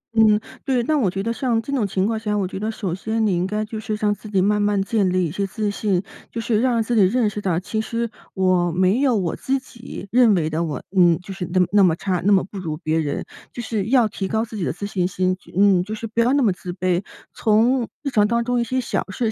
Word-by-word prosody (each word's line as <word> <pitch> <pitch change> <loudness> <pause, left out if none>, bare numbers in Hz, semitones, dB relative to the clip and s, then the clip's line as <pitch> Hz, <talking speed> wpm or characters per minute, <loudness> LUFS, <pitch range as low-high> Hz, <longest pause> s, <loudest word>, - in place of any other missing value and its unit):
嗯， 215 -2 +5 0.2
对， 255 -3 +1
那 310 +6 +1
我 210 -8 +2
觉 195 +2 -3
得 230 +2 -1
像 235 -1 0
这 255 +5 -5
种 240 -7 +1
情 190 0 0
况 220 +1 -1
下， 210 -1 -1
我 195 -2 0
觉 190 - -6
得 215 +2 -2
首 205 -5 -3
先 220 +4 -1
你 200 -4 +2
应 175 +2 0
该 210 +2 -2
就 220 0 -6
是 215 0 -3
让 210 -1 +1
自 210 +1 -10
己 195 -2 +1
慢 210 +1 +2
慢 205 -1 +2
建 200 -2 +1
立 185 0 +1
一 160 - -3
些 200 +4 -2
自 210 0 -2
信。 200 -3 0 0.3
就 230 - -4
是 225 -1 +1
让 240 -2 +2
自 235 +2 -1
己 220 - +5
认 215 +4 +3
识 210 - -5
到， 180 -4 0
其 215 +4 -3
实 230 +1 -2 0.3
我 185 -2 +2
没 185 +6 +2
有 265 -4 +3
我 180 -5 -1
自 270 +1 -1
己， 235 -5 -10
认 235 -4 +5
为 160 -3 0
的， 160 +2 0
我 155 -3 -4
嗯， 175 -3 +5
就 185 +2 -9
是 185 -2 -5
那 185 - +2
么 180 - +5
那 205 0 +5
么 175 -4 +4
差、 180 0 -2
那 205 - +3
么 195 -2 +5
不 195 +1 -8
如 160 -4 -4
别 160 0 -1
人。 145 -3 -2 0.3
就 240 - -5
是 220 -4 -2
要 240 0 +4
提 195 -2 -4
高 220 +3 0
自 220 - -10
己 200 - -3
的 - - 0
自 180 +5 -6
信 185 -3 -1
心， 185 0 0
就 185 - -19
嗯， 195 -2 +5
就 210 +3 -5
是 225 - -6
不 225 +1 -4
要 240 +2 +3
那 285 -1 +3
么 215 - +4
自 180 0 -7
卑。 185 0 0 0.3
从 230 +3 +2 0.2
日 280 - -2
常 210 -3 +3
当 235 +1 +1
中 245 0 0
一 - - +1
些 255 +2 -1
小 240 - -1
事 220 +2 -1
210 Hz, 300 characters per minute, -22 LUFS, 185-230 Hz, 0.3 s, 嗯